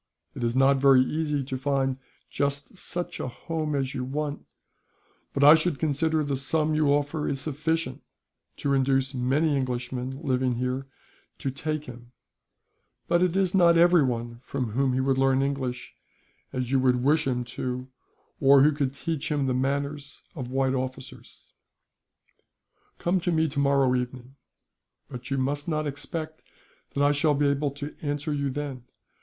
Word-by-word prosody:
It - - -6
is 120 +1 0
not 135 +1 +5
very 135 -1 +6
easy 150 0 -1
to 130 0 -4
find 135 -1 0 0.3
just 140 +5 -2
such 175 -1 -5
a - - -3
home 155 +4 -3
as 135 -1 -1
you 130 -3 -3
want, 145 +2 -4 0.8
but 140 - 0
I 145 +2 +10
should 160 -1 +2
consider 155 +1 +1
the 140 -1 -1
sum 155 +3 0
you 155 -1 +2
offer 145 +1 0
is 135 - -2
sufficient 155 -1 -2 0.6
to 140 - 0
induce 135 0 +2
many 140 +5 +1
Englishmen 130 0 -3
living 130 -3 +1
here 125 +2 -2 0.5
to 135 - -3
take 155 +2 -3
him; 120 -2 -12 0.9
but 175 - +3
it 180 -1 +2
is 190 -2 +1
not 170 -3 +5
everyone 130 -9 +3
from 125 -5 -3
whom 130 +3 +1
he 130 - 0
would 135 0 +1
learn 135 0 +3
English, 135 -3 -3 0.6
as 130 -1 -3
you 135 - +3
would 125 -1 +2
wish 150 +2 +3
him 125 -2 0
to 125 +2 -4
do, 130 - -13 0.5
or 135 -1 +6
who 150 - +5
could 140 -2 -2
teach 160 0 -3
him 145 -2 +1
the 130 - +1
manners 140 +2 -2
of 130 -7 -6
white 135 0 +1
officers. 130 0 -7 1.4
"Come 180 +2 +1
to 175 0 -1
me 160 -1 +2
tomorrow 140 -2 +2
evening, 125 +1 -4 0.8
but 125 0 -8
you 135 - 0
must 145 +3 -1
not 155 -2 -1
expect 155 +2 -5 0.5
that 140 - +2
I 145 - +5
shall 145 +1 +2
be 145 +1 +1
able 140 +1 0
to 145 +1 -6
answer 145 +1 -2
you 140 -1 -1
then. 135 -3 -5
140 Hz, 165 wpm, -26 LUFS, 130-150 Hz, 1.4 s, I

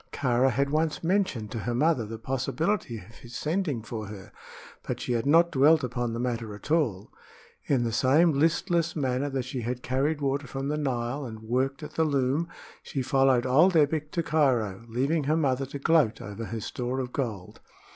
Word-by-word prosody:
Kāra 130 -1 +2
had 140 +3 0
once 155 +1 0
mentioned 170 - 0
to 115 - -3
her 120 +3 -2
mother 130 -4 +2
the 115 +1 -6
possibility 135 - -1
of 110 +3 -13
his 120 0 -12
sending 155 - -1
for 110 -2 -6
her; 100 -2 -10 0.5
but - - -4
she 125 - -2
had 115 +3 -1
not 170 +3 +5
dwelt 150 +3 +5
upon 120 -1 -2
the 115 - -3
matter 115 -4 -3
at 105 - -10
all. 115 - 0 0.5
In 130 -4 +2
the 115 - -1
same 140 +8 +4
listless 165 +3 +1
manner 135 -1 0
that 135 -2 -2
she 130 -1 -4
had 125 +2 -4
carried 140 +4 0
water 140 0 -1
from 135 +3 -4
the 150 - 0
Nile 130 0 -2
and 110 -3 -8
worked 130 +5 -1
at 150 +1 -8
the 160 - +2
loom 140 +2 +1 0.3
she 135 - -4
followed 135 -1 +3
old 155 +9 +4
Ebbek 150 0 +2
to 170 - 0
Cairo, 120 -10 +1
leaving 135 +6 0
her 155 +3 +2
mother 135 -3 0
to 140 - -6
gloat 150 -5 +3
over 105 +3 -6
her 115 0 -5
store 125 +4 -3
of 125 -1 -4
gold. 110 -9 -4
135 Hz, 195 wpm, -27 LUFS, 120-150 Hz, 0.5 s, not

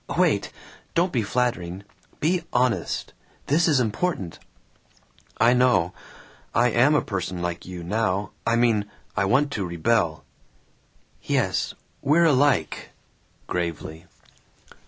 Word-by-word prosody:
Wait! - - +2 0.4
Don't 175 +2 +2
be 120 - +2
flattering. 100 -5 -1 0.4
Be 170 +2 +1
honest. 125 -1 0 0.3
This 160 +5 +3
is 150 -5 +4
important." 110 - -2 1.0
"I 115 +2 +5
know. 100 -8 +3 0.6
I 120 +1 +4
am 130 +7 +4
a - - +2
person 95 -3 -3
like 85 0 -4
you 90 -2 -7
now! 100 0 -1
I 115 - +2
mean, 115 -4 +2 0.3
I 100 - +1
want 140 +8 +2
to 105 - -2
rebel." 85 -1 0 1.0
"Yes. - - 0 0.3
We're 155 +5 +4
alike," 135 - +2 0.6
gravely. 85 -1 -4
115 Hz, 115 wpm, -24 LUFS, 90-130 Hz, 1.0 s, I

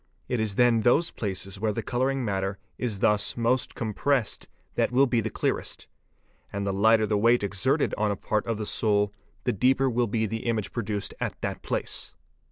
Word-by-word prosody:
It 125 - -1
is 110 -2 -1
then 120 -1 +4
those 145 +9 +3
places 95 -2 -4
where 110 0 +1
the - - -3
colouring 130 +1 0
matter 95 -1 -1 0.2
is 110 -6 -2
thus 105 +2 +2
most 120 +2 +1
com 110 -3 -3
pressed 135 -1 0 0.3
that - - +1
will 130 +3 +5
be 120 -3 +1
the 110 - -2
clearest; - - -2 0.7
and 100 0 -3
the 100 - 0
lighter 110 +2 +4
the 105 -1 +1
weight 115 +1 +4
exerted 100 +9 +1
on 105 0 +2
a 100 - 0
part 105 +2 -1
of 115 -2 -1
the 105 - -3
sole 105 -1 +1 0.3
the 125 - +1
deeper 130 +5 +3
will 120 0 +1
be 110 +1 0
the 115 +2 -4
image 110 -3 -1
produced 105 -4 -2
at - - -3
that - - -3
place. - - -3
110 Hz, 195 wpm, -27 LUFS, 100-120 Hz, 0.7 s, will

